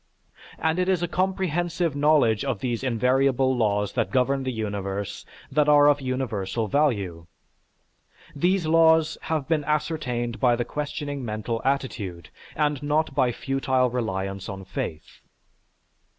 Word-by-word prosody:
And 160 +2 0
it 180 +1 +1
is 180 -2 +1
a - - +1
comprehensive 175 -3 -1
knowledge 145 -7 +3
of 135 -7 -2
these 120 +1 -2
invariable 130 +1 +2
laws 105 -3 0
that - - 0
govern 135 +1 +1
the 130 -1 -2
universe 100 -3 -4 0.2
that 150 +1 +3
are 145 -1 +7
of 145 -1 +3
universal 120 -5 -2
value. 100 - 0 1.1
These 180 +4 +1
laws 160 0 +4
have 155 -4 -2
been 155 -2 +1
ascertained 145 -6 -2
by 125 -2 +4
the 120 0 -2
questioning 145 -2 -4
mental 110 +1 -3
attitude, 110 -10 -2 0.3
and 150 -2 0
not 150 0 0
by 130 -2 +3
a - - 0
futile 130 -1 0
reliance 95 -5 -3
on 95 0 -7
faith. 80 -3 -6
135 Hz, 135 wpm, -25 LUFS, 110-150 Hz, 1.1 s, are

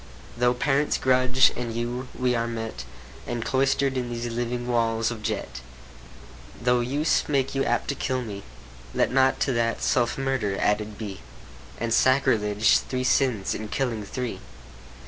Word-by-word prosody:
Though 125 +1 +2
parents 145 +3 +1
grudge, 130 0 +4
and 120 -2 -4
you, 120 +2 -3
we're 125 -2 +1
met, 115 - -5 0.4
And 120 -1 -3
cloister'd 135 0 +1
in 125 -1 -2
these 120 0 -4
living 120 +1 -3
walls 115 -1 +1
of 115 -2 -6
jet. 105 - -4 1.0
Though 125 +1 +2
use 140 +6 +1
make 135 -2 +1
you 135 0 +1
apt - - 0
to - - +1
kill 130 -2 -2
me, 100 -3 -6 0.5
Let - - +2
not 130 0 +3
to 135 - +1
that 115 -1 0
self 120 -2 +1
murder 130 -8 -1
added 105 0 0
be, 100 -3 -6 0.6
And 115 0 -1
sacrilege, 110 -5 +3
three 130 -1 -3
sins 125 -6 +1
in 110 - -5
killing 115 -2 -2
three. 125 +3 -4
120 Hz, 150 wpm, -25 LUFS, 115-130 Hz, 1.0 s, grudge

